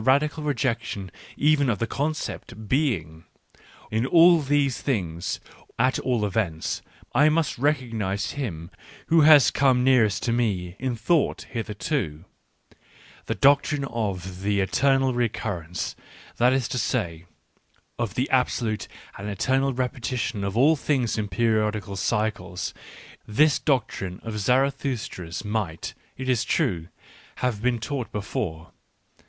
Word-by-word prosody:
radical 145 Hz, +5 st, +2 dB
rejection 120 Hz, -, -2 dB, 0.3 s
even 145 Hz, -2 st, +3 dB
of 110 Hz, -, +1 dB
the 115 Hz, -, -1 dB
concept 140 Hz, -6 st, -4 dB
BttHjgf— 95 Hz, -, 0 dB, 0.3 s
i -, -, -27 dB, 0.3 s
n 110 Hz, +4 st, 0 dB
all 170 Hz, +1 st, +7 dB
these 140 Hz, -2 st, +1 dB
th 135 Hz, -5 st, +1 dB
ings, 85 Hz, -3 st, -4 dB, 0.4 s
at 130 Hz, +3 st, +2 dB
all 120 Hz, -5 st, 0 dB
events, 95 Hz, -6 st, -1 dB, 0.3 s
I 150 Hz, +2 st, +5 dB
must 155 Hz, -4 st, 0 dB
recognise 115 Hz, -9 st, -1 dB
h 145 Hz, -, -7 dB
im 85 Hz, -, -4 dB, 0.4 s
who 165 Hz, 0 st, +6 dB
has 150 Hz, -3 st, +7 dB
come 130 Hz, -2 st, +3 dB
nearest 125 Hz, -6 st, +3 dB
to 120 Hz, -, +1 dB
me 95 Hz, -7 st, -1 dB
InThought 130 Hz, +5 st, 0 dB
hitheF 110 Hz, -3 st, -4 dB
to. 90 Hz, -, -2 dB, 1.0 s
TEie -, -, -1 dB
doctrinFoTIhe^EternaTTtecurrenc^ 120 Hz, -, +1 dB
^ 85 Hz, -5 st, -4 dB, 0.4 s
^that 125 Hz, +2 st, +5 dB
is 130 Hz, -2 st, +1 dB
to 125 Hz, -, -1 dB
sav. 100 Hz, -8 st, -1 dB, 0.8 s
of 115 Hz, -4 st, -2 dB
the 130 Hz, -, 0 dB
absolute 120 Hz, -4 st, +1 dB, 0.3 s
and 105 Hz, +2 st, -4 dB
eternal 135 Hz, +7 st, +1 dB
repetition 125 Hz, -3 st, -2 dB
f -, -, 0 dB
of 100 Hz, +3 st, -3 dB
all 150 Hz, +6 st, +5 dB
things 135 Hz, -5 st, 0 dB
jp 105 Hz, -2 st, -2 dB
p?riQflfc^) 105 Hz, -2 st, 0 dB, 0.2 s
liY*?!?? 90 Hz, -1 st, -4 dB, 0.4 s
— -, -, -22 dB
this 150 Hz, -1 st, +5 dB
doctrine 110 Hz, -, -1 dB
of 110 Hz, -2 st, -4 dB
Zarathustra's 125 Hz, -7 st, -1 dB
might, 105 Hz, -7 st, -3 dB, 0.2 s
it 130 Hz, -, -5 dB
is 125 Hz, -2 st, +2 dB
true, 95 Hz, -, 0 dB, 0.5 s
have 120 Hz, -5 st, -1 dB
been 125 Hz, 0 st, +1 dB
taught 120 Hz, +2 st, -4 dB
be 105 Hz, -, -3 dB
fore. 80 Hz, -5 st, -4 dB
120 Hz, 130 wpm, -25 LUFS, 100-135 Hz, 1.0 s, all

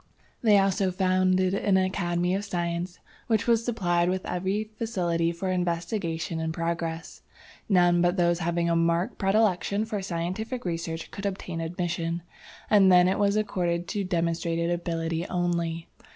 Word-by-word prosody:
They 215 Hz, -3 st, +5 dB
also 195 Hz, 0 st, +2 dB
founded 185 Hz, 0 st, +2 dB
an 200 Hz, -1 st, +2 dB
academy 180 Hz, -1 st, 0 dB
of 195 Hz, +2 st, -1 dB
science, 175 Hz, -2 st, -3 dB, 0.3 s
which 220 Hz, -4 st, +1 dB
was 230 Hz, -1 st, +3 dB
supplied 175 Hz, -7 st, +1 dB
with 185 Hz, 0 st, -2 dB
every 190 Hz, +4 st, -1 dB
facility 185 Hz, -7 st, -1 dB
for 185 Hz, +2 st, -3 dB
investigation 170 Hz, -1 st, -2 dB
and 160 Hz, 0 st, -2 dB
progress. 165 Hz, 0 st, -4 dB, 0.5 s
None 175 Hz, -3 st, +4 dB
but 175 Hz, +2 st, +2 dB
those 175 Hz, -1 st, +2 dB
having 170 Hz, 0 st, 0 dB
a 170 Hz, -, +2 dB
marked 170 Hz, +5 st, +1 dB
predilection 200 Hz, 0 st, +2 dB
for 215 Hz, -3 st, -3 dB
scientific 190 Hz, +7 st, -4 dB
research 165 Hz, -1 st, -4 dB
could 200 Hz, 0 st, -4 dB
obtain 180 Hz, -4 st, -4 dB
admission, 170 Hz, 0 st, -2 dB, 0.4 s
and 195 Hz, -3 st, +5 dB
then 180 Hz, 0 st, +6 dB
it 190 Hz, +2 st, +1 dB
was 200 Hz, 0 st, +2 dB
accorded 175 Hz, -5 st, -1 dB
to 205 Hz, -3 st, -1 dB
demonstrated 170 Hz, -1 st, -1 dB
ability 165 Hz, 0 st, -2 dB
only. 170 Hz, -2 st, -1 dB
175 Hz, 145 wpm, -27 LUFS, 170-195 Hz, 0.5 s, then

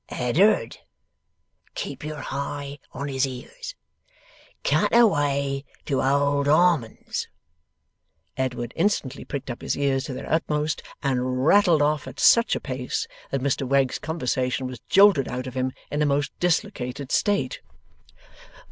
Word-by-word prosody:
'Eddard! 150 Hz, -, +2 dB, 1.0 s
(keep -, -, -5 dB
yer 155 Hz, -1 st, -5 dB
hi 140 Hz, +1 st, -5 dB
on 140 Hz, +2 st, -5 dB
his 135 Hz, -1 st, 0 dB
ears) 470 Hz, -, -8 dB, 0.9 s
cut -, -, +2 dB
away 140 Hz, -10 st, +2 dB, 0.2 s
to 135 Hz, -, 0 dB
Old 140 Hz, +1 st, +2 dB
Harmon's.' 155 Hz, -6 st, +2 dB, 1.1 s
Edward 125 Hz, -2 st, -3 dB
instantly 145 Hz, -10 st, 0 dB
pricked 140 Hz, -2 st, -5 dB
up 120 Hz, -, -8 dB
his -, -, -2 dB
ears 140 Hz, -1 st, +1 dB
to 135 Hz, -, -5 dB
their -, -, -7 dB
utmost, 150 Hz, -1 st, 0 dB, 0.2 s
and 130 Hz, -1 st, 0 dB
rattled 175 Hz, -4 st, +5 dB
off 150 Hz, -1 st, 0 dB
at -, -, -9 dB
such 235 Hz, 0 st, +5 dB
a -, -, -2 dB
pace 130 Hz, -2 st, -3 dB, 0.2 s
that 135 Hz, -, -2 dB
Mr 140 Hz, 0 st, 0 dB
Wegg's 135 Hz, -1 st, +2 dB
conversation 130 Hz, -5 st, -1 dB
was 125 Hz, -2 st, -6 dB
jolted 195 Hz, -8 st, +6 dB
out 125 Hz, 0 st, -4 dB
of 130 Hz, -, -6 dB
him 130 Hz, 0 st, -1 dB, 0.2 s
in 145 Hz, -, -1 dB
a -, -, +4 dB
most 140 Hz, -1 st, 0 dB
dislocated 145 Hz, -, -1 dB
state. 200 Hz, -11 st, +1 dB
140 Hz, 135 wpm, -24 LUFS, 130-155 Hz, 1.1 s, jolted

